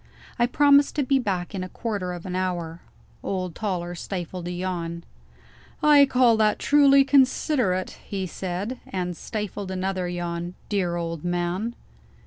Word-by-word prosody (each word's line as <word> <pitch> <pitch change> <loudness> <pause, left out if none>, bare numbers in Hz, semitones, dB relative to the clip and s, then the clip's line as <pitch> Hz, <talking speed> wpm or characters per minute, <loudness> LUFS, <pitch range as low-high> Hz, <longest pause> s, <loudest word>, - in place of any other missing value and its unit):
I 240 - +4
promised 285 +2 +4
to 295 - +1
be 270 +1 +2
back 190 -5 -2
in 190 -2 -3
a 185 - -6
quarter 205 -6 -3
of 175 -1 -8
an 180 -1 -4
hour. 175 -3 -2 0.4
Old 185 -3 -3
Toller 180 -4 -3
stifled 180 0 -5
a - - -3
yawn. 175 -2 -4 0.8
"I 290 -2 +7
call 250 -3 +4
that 215 -1 +3
truly 280 -1 +5
considerate," 260 - +2
he 195 -2 -4
said 190 +7 -4
and 180 -2 -3
stifled 205 0 -5
another 185 -1 -2
yawn. 175 0 -4
Dear 185 -4 0
old 165 -2 -4
man! 175 +6 -1
185 Hz, 145 wpm, -25 LUFS, 175-235 Hz, 0.8 s, I